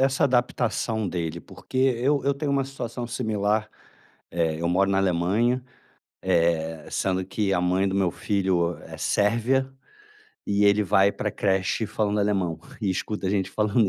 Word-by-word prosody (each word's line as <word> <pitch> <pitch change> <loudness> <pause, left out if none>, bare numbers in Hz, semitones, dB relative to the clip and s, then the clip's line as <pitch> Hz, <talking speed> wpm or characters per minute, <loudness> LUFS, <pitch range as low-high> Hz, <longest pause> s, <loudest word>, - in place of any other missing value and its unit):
essa 135 0 +3
adaptação, 120 -4 0
dele? 85 -2 -3
Porque - - -10
eu 135 +2 +2
eu 140 0 +2
tenho 140 +1 -2
uma 140 -1 +1
situação 125 -3 -5
similar. 110 -3 -1 0.6
É 80 -2 -1
eu 85 - 0
moro 95 +2 +2
na 95 - +2
Alemanha, 100 +8 +1 0.6
eh, 80 -1 0
sendo 95 -1 0
que 95 +1 -1
a 90 - +2
mãe 90 +2 +2
do 95 - -2
meu 95 -3 +2
filho 95 -4 0
é - - -10
sérvia, 120 +6 +1 0.8
e 100 0 +2
ele 100 +1 +5
vai 95 +2 +4
pra 105 - -2
creche 95 +2 0
falando 105 0 -1
alemão, 95 -5 0 0.2
e 105 - 0
escuta 100 +1 -3
a - - +1
gente 100 -2 0
falando 105 +2 +1
100 Hz, 160 wpm, -25 LUFS, 95-120 Hz, 0.8 s, ele